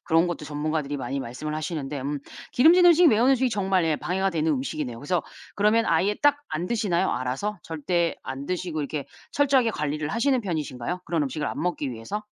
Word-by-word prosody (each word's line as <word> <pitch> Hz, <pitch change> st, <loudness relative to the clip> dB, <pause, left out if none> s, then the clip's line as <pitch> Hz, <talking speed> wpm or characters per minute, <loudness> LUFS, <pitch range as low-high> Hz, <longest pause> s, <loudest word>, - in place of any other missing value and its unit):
그런 165 Hz, +1 st, +3 dB
것도 175 Hz, -3 st, -4 dB
전문가들이 150 Hz, -1 st, -2 dB
많이 135 Hz, +1 st, -3 dB
말씀을 130 Hz, +6 st, -5 dB
하시는데 150 Hz, -3 st, -4 dB
음 145 Hz, +2 st, -3 dB, 0.3 s
기름진 335 Hz, +7 st, +6 dB
음식, 350 Hz, 0 st, +7 dB
매운 235 Hz, +4 st, +4 dB
음식이 260 Hz, -1 st, +3 dB
정말 190 Hz, -4 st, +1 dB
예 160 Hz, -1 st, +2 dB
방해가 190 Hz, +2 st, -1 dB
되는 160 Hz, -1 st, 0 dB
음식이네요. 130 Hz, -3 st, -3 dB
그래서 160 Hz, +5 st, -1 dB, 0.3 s
그러면 215 Hz, +2 st, +3 dB
아예 180 Hz, +5 st, +2 dB
딱 290 Hz, 0 st, +5 dB
안 170 Hz, +3 st, -3 dB
드시나요? 190 Hz, -5 st, +1 dB
알아서? 135 Hz, +12 st, -2 dB
절대 165 Hz, +2 st, -1 dB
안 135 Hz, +1 st, -6 dB
드시고 175 Hz, -4 st, -2 dB
이렇게 145 Hz, -1 st, -4 dB, 0.3 s
철저하게 270 Hz, -5 st, +3 dB
관리를 150 Hz, -3 st, -2 dB
하시는 255 Hz, -, +1 dB
편이신가요? 160 Hz, -, -3 dB
그런 165 Hz, -3 st, 0 dB
음식을 150 Hz, +2 st, -3 dB
안 -, -, -4 dB
먹기 160 Hz, -5 st, -1 dB
위해서? 120 Hz, -, -5 dB
165 Hz, 455 characters per minute, -25 LUFS, 145-210 Hz, 0.3 s, 음식